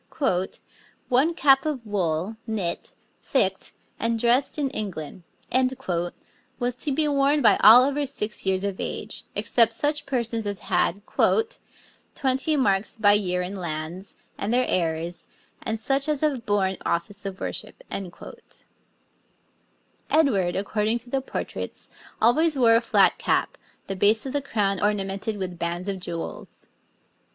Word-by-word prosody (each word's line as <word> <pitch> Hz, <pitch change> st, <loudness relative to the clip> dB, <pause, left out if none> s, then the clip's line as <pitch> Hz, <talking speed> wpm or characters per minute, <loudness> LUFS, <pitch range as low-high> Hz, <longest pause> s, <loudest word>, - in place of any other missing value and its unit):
'One 280 Hz, +7 st, +3 dB
cap 270 Hz, -2 st, +5 dB
of 285 Hz, -6 st, -3 dB
wool, 185 Hz, -1 st, -1 dB
knit, 200 Hz, -6 st, -3 dB, 0.3 s
thicked, -, -, 0 dB, 0.3 s
and 230 Hz, 0 st, 0 dB
dressed 240 Hz, +6 st, +2 dB
in 280 Hz, -3 st, -1 dB
England,' 190 Hz, -, -5 dB, 1.4 s
was 245 Hz, 0 st, -1 dB
to 285 Hz, -, -1 dB
be 300 Hz, +3 st, +2 dB
worn 285 Hz, 0 st, +2 dB
by 225 Hz, -, +6 dB
all 235 Hz, +4 st, +9 dB
over 285 Hz, +1 st, 0 dB
six 215 Hz, -5 st, -2 dB
years 190 Hz, 0 st, 0 dB
of 200 Hz, -2 st, -3 dB
age, -, -, -5 dB
except 230 Hz, -2 st, +3 dB
such 290 Hz, +1 st, -1 dB
persons 235 Hz, -4 st, -1 dB
as 200 Hz, -1 st, -4 dB
had 200 Hz, +4 st, +1 dB, 1.1 s
'twenty 270 Hz, +3 st, +1 dB
marks 200 Hz, -7 st, +1 dB
by 205 Hz, -3 st, +5 dB
year 180 Hz, -3 st, +1 dB
in 185 Hz, +3 st, -5 dB
lands, 170 Hz, +1 st, -5 dB, 0.2 s
and 200 Hz, -, -2 dB
their 250 Hz, +1 st, +3 dB
heirs, 170 Hz, 0 st, -1 dB, 0.3 s
and 220 Hz, 0 st, -2 dB
such 275 Hz, +5 st, 0 dB
as 300 Hz, -2 st, +1 dB
have 275 Hz, -7 st, -1 dB
borne 190 Hz, -2 st, +1 dB
office 200 Hz, +5 st, -2 dB
of 195 Hz, -1 st, -6 dB
worship.' -, -, -6 dB, 2.3 s
Edward, 200 Hz, -, +2 dB
according 210 Hz, +3 st, 0 dB
to 240 Hz, +1 st, -14 dB
the 270 Hz, -, 0 dB
portraits, 265 Hz, -, -4 dB, 0.3 s
always 300 Hz, +7 st, +3 dB
wore 230 Hz, -3 st, +5 dB
a 230 Hz, -, +4 dB
flat 230 Hz, -, +3 dB
cap, -, -, 0 dB, 0.3 s
the 195 Hz, -, -4 dB
base 210 Hz, +5 st, +3 dB
of 265 Hz, -, -4 dB
the 285 Hz, -, 0 dB
crown 200 Hz, -7 st, -1 dB
ornamented 205 Hz, +1 st, -1 dB
with 180 Hz, -3 st, -5 dB
bands 175 Hz, +2 st, -3 dB
of 195 Hz, -1 st, -2 dB
jewels. 170 Hz, -2 st, -6 dB
220 Hz, 140 wpm, -25 LUFS, 190-265 Hz, 2.3 s, all